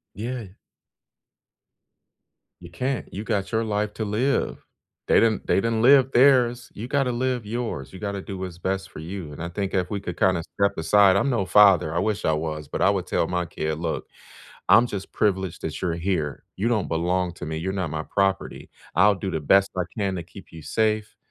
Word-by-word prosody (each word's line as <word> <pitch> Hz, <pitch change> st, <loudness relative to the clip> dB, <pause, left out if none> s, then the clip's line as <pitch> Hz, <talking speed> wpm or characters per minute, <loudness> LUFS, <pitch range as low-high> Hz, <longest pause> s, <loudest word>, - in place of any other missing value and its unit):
Yeah. 115 Hz, +1 st, -5 dB, 2.1 s
You 85 Hz, -1 st, -12 dB
can't. 125 Hz, +7 st, -3 dB
You 100 Hz, +3 st, -5 dB
got 105 Hz, -3 st, -2 dB
your 115 Hz, 0 st, +1 dB
life 105 Hz, -1 st, -2 dB
to 110 Hz, -, -3 dB
live. 115 Hz, +7 st, -1 dB, 0.4 s
They -, -, +5 dB
didn't 115 Hz, -2 st, +1 dB
they -, -, +2 dB
didn't 115 Hz, +2 st, +1 dB
live 135 Hz, +2 st, +6 dB
theirs. 125 Hz, -2 st, +4 dB
You 110 Hz, -, -6 dB
gotta 135 Hz, -3 st, +1 dB
live 125 Hz, -2 st, -1 dB
yours. 110 Hz, -, -4 dB
You 95 Hz, -, -9 dB
gotta 100 Hz, -1 st, -4 dB
do 95 Hz, 0 st, -7 dB
what's 90 Hz, -2 st, -6 dB
best 95 Hz, +2 st, -3 dB
for -, -, -11 dB
you, 85 Hz, -1 st, -7 dB
and 75 Hz, -, -8 dB
I 85 Hz, -, -3 dB
think 95 Hz, +2 st, -3 dB
if 90 Hz, -1 st, 0 dB
we 100 Hz, -, -2 dB
could 90 Hz, -3 st, -6 dB
kinda 90 Hz, -3 st, +2 dB
step 100 Hz, 0 st, +2 dB
aside 95 Hz, +4 st, +4 dB
I'm 135 Hz, -, +2 dB
no 115 Hz, -7 st, 0 dB
father. 95 Hz, -6 st, +5 dB
I -, -, +1 dB
wish 105 Hz, +1 st, -1 dB
I 80 Hz, -, +3 dB
was, 75 Hz, -1 st, -4 dB
but -, -, -3 dB
I -, -, +5 dB
would -, -, -1 dB
tell -, -, 0 dB
my 90 Hz, -1 st, -2 dB
kid, 75 Hz, -1 st, -3 dB
"Look, 80 Hz, -1 st, -3 dB, 0.6 s
I'm 120 Hz, -, +7 dB
just 100 Hz, -4 st, -6 dB
privileged 95 Hz, -4 st, -1 dB
that 80 Hz, -, -4 dB
you're 90 Hz, -3 st, -1 dB
here. 85 Hz, -5 st, -2 dB
You 105 Hz, -, -1 dB
don't 110 Hz, -5 st, 0 dB
belong 90 Hz, +2 st, 0 dB
to -, -, -8 dB
me. 80 Hz, +1 st, -4 dB
You're 95 Hz, +4 st, -3 dB
not 95 Hz, -4 st, -2 dB
my 80 Hz, +1 st, -3 dB
property. 95 Hz, +2 st, -1 dB, 0.3 s
I'll 100 Hz, +3 st, +5 dB
do 95 Hz, 0 st, -4 dB
the 80 Hz, -, -2 dB
best 95 Hz, +6 st, +4 dB
I 90 Hz, -, 0 dB
can 100 Hz, -3 st, -1 dB
to 85 Hz, -, -4 dB
keep 90 Hz, +4 st, -14 dB
you 80 Hz, -, -9 dB
safe, 110 Hz, +4 st, -1 dB
95 Hz, 210 wpm, -24 LUFS, 85-110 Hz, 2.1 s, I'm